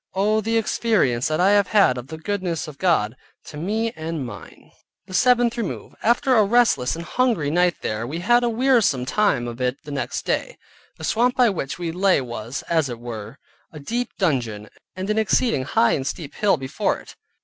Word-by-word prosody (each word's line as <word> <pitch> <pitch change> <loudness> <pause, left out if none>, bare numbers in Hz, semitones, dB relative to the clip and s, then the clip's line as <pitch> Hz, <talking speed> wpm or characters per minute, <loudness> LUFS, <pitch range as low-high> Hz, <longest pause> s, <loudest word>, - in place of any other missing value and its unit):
Oh 210 +3 +2
the 225 +2 0
experience 205 - +1
that 155 0 -1
I 190 +3 +4
have 205 -2 +4
had 195 -12 +4
of 125 0 -7
the 160 - -7
goodness 180 -2 -3
of 150 -2 -11
God, 130 - +1 0.3
to - - -10
me 215 +9 -1
and 160 -3 -4
mine! 105 -5 -11 0.3
THE 185 - -12
SEVENTH 240 +2 +3
REMOVE 220 - -5
After 250 +3 +3
a 220 - +6
restless 205 - +2
and 170 +1 -7
hungry 225 - 0
night 175 0 +1
there, 110 +2 -2
we 150 +6 -4
had 240 +8 +3
a 240 - +2
wearisome 230 - +2
time 135 - +1
of 120 +1 -7
it 125 +1 0
the 150 - -9
next 140 -3 -3
day. - - -2 0.4
The - - -11
swamp 240 +8 +1
by 245 -4 +4
which 140 -6 -4
we 170 -2 -3
lay 185 +1 +3
was, 120 -1 -5
as 160 -5 0
it 120 -2 -6
were, 115 0 -7 0.3
a 155 - -10
deep 240 +12 -3
dungeon, 120 - -1 0.3
and 185 +1 -4
an 215 - +1
exceeding 220 - +1
high 115 - +3
and 135 -1 -1
steep 150 -3 -5
hill 205 -5 +2
before 130 -1 -2
it. - - -14
170 Hz, 200 wpm, -22 LUFS, 130-220 Hz, 0.4 s, a